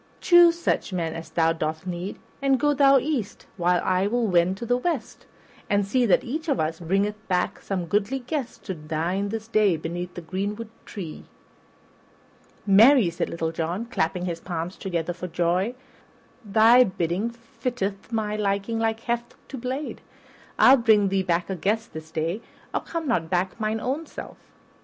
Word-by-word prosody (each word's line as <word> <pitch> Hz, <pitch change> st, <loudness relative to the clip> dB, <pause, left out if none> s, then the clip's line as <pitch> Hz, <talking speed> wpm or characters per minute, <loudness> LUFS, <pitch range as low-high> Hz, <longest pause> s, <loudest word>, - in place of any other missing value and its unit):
Choose 345 Hz, -1 st, +6 dB
such 340 Hz, -, -1 dB
men 170 Hz, -3 st, -2 dB
as 165 Hz, 0 st, -7 dB
thou 165 Hz, -1 st, +2 dB
dost 160 Hz, +1 st, -3 dB
need, 180 Hz, +2 st, -4 dB, 0.2 s
and 270 Hz, -1 st, +3 dB
go 295 Hz, +3 st, +3 dB
thou 275 Hz, -1 st, +6 dB
east 265 Hz, -6 st, -2 dB
while 180 Hz, -1 st, +2 dB
I 185 Hz, +1 st, +2 dB
will 240 Hz, +2 st, +1 dB
wend 180 Hz, -1 st, +2 dB
to 235 Hz, -, -5 dB
the 245 Hz, +1 st, +2 dB
west, 255 Hz, -6 st, -3 dB, 0.4 s
and 200 Hz, -1 st, +2 dB
see 245 Hz, +4 st, +2 dB
that 190 Hz, -, +4 dB
each 310 Hz, +6 st, -4 dB
of 275 Hz, -, +1 dB
us 160 Hz, +1 st, -1 dB
bringeth 200 Hz, +5 st, -1 dB
back 180 Hz, -1 st, 0 dB
some 185 Hz, -3 st, -3 dB
goodly 205 Hz, +8 st, 0 dB
guest 265 Hz, 0 st, -5 dB
to 190 Hz, -, -4 dB
dine 165 Hz, +5 st, -2 dB
this 220 Hz, +1 st, -5 dB
day 210 Hz, -6 st, +3 dB
beneath 175 Hz, +3 st, -5 dB
the 175 Hz, -, -6 dB
greenwood 205 Hz, +6 st, -4 dB, 0.2 s
tree." 170 Hz, -7 st, -7 dB, 1.4 s
"Marry," 215 Hz, 0 st, +6 dB
cried 170 Hz, -, -2 dB
Little 165 Hz, -1 st, -2 dB
John, 170 Hz, +7 st, -3 dB
clapping 180 Hz, -5 st, -1 dB
his 170 Hz, -2 st, -3 dB
palms 170 Hz, +1 st, -4 dB
together 175 Hz, -2 st, -3 dB
for 180 Hz, +1 st, -6 dB
joy, 180 Hz, +7 st, 0 dB, 0.7 s
"thy 225 Hz, +4 st, +6 dB
bidding 185 Hz, +1 st, -1 dB
fitteth 230 Hz, -3 st, -5 dB
my 215 Hz, -2 st, -1 dB
liking 200 Hz, +2 st, -1 dB
like 225 Hz, 0 st, 0 dB
heft 235 Hz, 0 st, -3 dB
to 270 Hz, -, -6 dB
blade. 260 Hz, +4 st, -4 dB, 0.6 s
I'll 270 Hz, -, +8 dB
bring 215 Hz, -4 st, +4 dB
thee 195 Hz, 0 st, +1 dB
back 175 Hz, -2 st, 0 dB
a 190 Hz, -, -3 dB
guest 220 Hz, +6 st, -1 dB
this 160 Hz, 0 st, -8 dB
day, 165 Hz, +6 st, -2 dB, 0.3 s
or -, -, 0 dB
come 330 Hz, -2 st, -4 dB
not 170 Hz, -10 st, 0 dB
back 185 Hz, +4 st, -1 dB
mine 215 Hz, 0 st, -1 dB
own 275 Hz, +7 st, -3 dB
self." -, -, -9 dB
200 Hz, 170 wpm, -25 LUFS, 175-235 Hz, 1.4 s, I'll